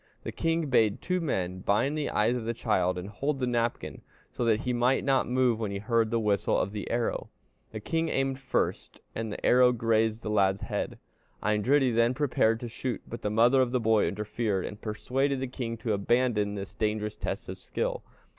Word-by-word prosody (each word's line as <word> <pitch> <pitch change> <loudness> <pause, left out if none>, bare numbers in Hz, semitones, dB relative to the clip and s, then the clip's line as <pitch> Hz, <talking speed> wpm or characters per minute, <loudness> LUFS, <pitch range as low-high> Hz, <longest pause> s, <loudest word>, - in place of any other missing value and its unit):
The - - -4
king 165 0 0
bade 110 -6 +3
two 180 0 -1
men 95 - -2
bind 105 +10 +1
the 150 -1 -1
eyes 110 +4 +2
of 120 -3 -4
the 115 +1 -2
child 90 -6 +1
and 90 +1 -5
hold 135 +7 -2
the 130 - 0
napkin, 115 - -2 0.3
so - - -2
that 110 -1 +2
he 125 - -1
might 125 +2 +2
not 135 -3 +2
move 125 -3 +2
when 110 -3 -2
he 100 - -3
heard 115 +2 +1
the 115 +1 +1
whistle 105 -2 +1
of 100 - -1
the 105 -1 -5
arrow. 120 0 -1 0.4
The 110 - -6
king 165 +6 -1
aimed 135 -1 0
first, 135 - -2
and 115 -1 -4
the - - -5
arrow 125 0 +6
grazed 115 -1 +1
the 105 - -3
lad's 95 -2 +2
head. - - -3 0.5
Eindridi 125 +6 +3
then 115 +2 +3
prepared 120 -5 +2
to 120 - -4
shoot; 120 +1 -4
but 115 - -7
the 105 - -1
mother 120 +5 +4
of 125 -2 +1
the 125 - +1
boy 110 -2 +3
interfered, 105 -1 -2
and 105 - -8
persuaded 130 +5 -1
the 130 - -2
king 120 -2 -5
to 115 -1 -1
abandon 105 0 +1
this 100 -1 -6
dangerous 105 0 -1
test - - -4
of - - -7
skill. - - -3
115 Hz, 205 wpm, -28 LUFS, 105-130 Hz, 0.5 s, arrow